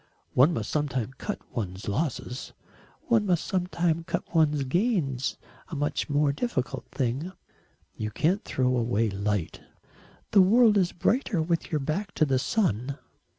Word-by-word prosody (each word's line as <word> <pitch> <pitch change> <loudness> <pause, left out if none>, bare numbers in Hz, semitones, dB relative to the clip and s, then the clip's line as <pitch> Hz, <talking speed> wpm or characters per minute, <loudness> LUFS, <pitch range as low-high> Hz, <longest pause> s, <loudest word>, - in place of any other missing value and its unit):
"One 135 +7 +6
must 115 -9 -3
sometimes 130 -5 -1
cut 210 - -3 0.2
one's 95 -4 -4
losses." 125 +1 -3 0.5
"One 230 -3 +3
must 175 -3 +1
sometimes 175 -3 0
cut - - -3
one's 150 -3 +3
gains 150 - 0 0.3
a - - -6
much 145 +2 -1
more 145 0 +2
difficult 135 - -2
thing." 135 +7 -2 0.6
"You 110 - -3
can't 175 - +1
throw 130 -1 +1
away 115 -2 +1
light." 100 -3 -2 0.7
"The 200 - +7
world 220 +3 +6
is 185 -3 +3
brighter 220 0 +1
with 165 +1 -1
your 155 -3 0
back 180 +9 -2
to 155 - +3
the 135 -3 +1
sun." 140 - 0
150 Hz, 145 wpm, -27 LUFS, 125-180 Hz, 0.7 s, The